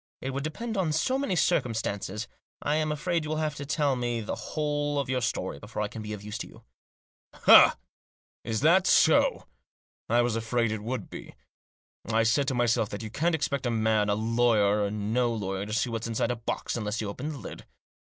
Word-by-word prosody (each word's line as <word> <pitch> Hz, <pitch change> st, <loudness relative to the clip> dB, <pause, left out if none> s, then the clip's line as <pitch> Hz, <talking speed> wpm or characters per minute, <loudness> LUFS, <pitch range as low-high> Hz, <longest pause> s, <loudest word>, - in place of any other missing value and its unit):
It 135 Hz, -, -4 dB
would 135 Hz, +1 st, -3 dB
depend 220 Hz, +9 st, -4 dB
on 175 Hz, -5 st, +1 dB
so 255 Hz, -, +1 dB
many 240 Hz, -10 st, -1 dB
circumstances. 110 Hz, -, -1 dB, 0.3 s
I 145 Hz, -, -1 dB
am 155 Hz, -1 st, 0 dB
afraid 165 Hz, +2 st, -1 dB
you 150 Hz, -, -5 dB
will 155 Hz, -, -1 dB
have 155 Hz, -1 st, -1 dB
to 140 Hz, -1 st, -7 dB
tell 145 Hz, -3 st, +1 dB
me 120 Hz, -1 st, -2 dB
the 110 Hz, -, -4 dB
whole 145 Hz, -1 st, -2 dB
of 140 Hz, -2 st, -1 dB
your 130 Hz, -1 st, 0 dB
story 115 Hz, -10 st, -2 dB
before 105 Hz, +3 st, -4 dB
I -, -, -1 dB
can 110 Hz, -, -7 dB
be 105 Hz, 0 st, -6 dB
of 105 Hz, -1 st, -8 dB
use 105 Hz, +1 st, -6 dB
to -, -, -5 dB
you." -, -, -16 dB, 0.4 s
" -, -, -70 dB
Ah! -, -, +9 dB, 0.7 s
That 155 Hz, -, +3 dB
so? -, -, +4 dB, 0.6 s
I 120 Hz, +2 st, +4 dB
was 120 Hz, -2 st, 0 dB
afraid 115 Hz, 0 st, 0 dB
it 110 Hz, -1 st, -3 dB
would 115 Hz, -1 st, -5 dB
be. -, -, -9 dB, 0.7 s
I 115 Hz, 0 st, +2 dB
said 130 Hz, +5 st, +2 dB
to 135 Hz, -, 0 dB
myself 115 Hz, -3 st, +1 dB
that 100 Hz, +2 st, -6 dB
you 110 Hz, -, -6 dB
can't 165 Hz, +7 st, +1 dB
expect 140 Hz, -4 st, -1 dB
a -, -, +1 dB
man, 110 Hz, -2 st, +1 dB
lawyer 105 Hz, -1 st, +2 dB
or 100 Hz, -, 0 dB
no 110 Hz, +4 st, 0 dB
lawyer, 100 Hz, -1 st, -3 dB
to 105 Hz, -, -5 dB
see 115 Hz, +2 st, 0 dB
what's 115 Hz, 0 st, -3 dB
inside 115 Hz, +1 st, 0 dB
a -, -, -1 dB
box 115 Hz, 0 st, -3 dB
unless 105 Hz, -1 st, -3 dB
you 110 Hz, -, -2 dB
open 125 Hz, +9 st, -5 dB
the 150 Hz, -, -6 dB
lid. 105 Hz, -, -9 dB
120 Hz, 210 wpm, -27 LUFS, 110-145 Hz, 0.7 s, Ah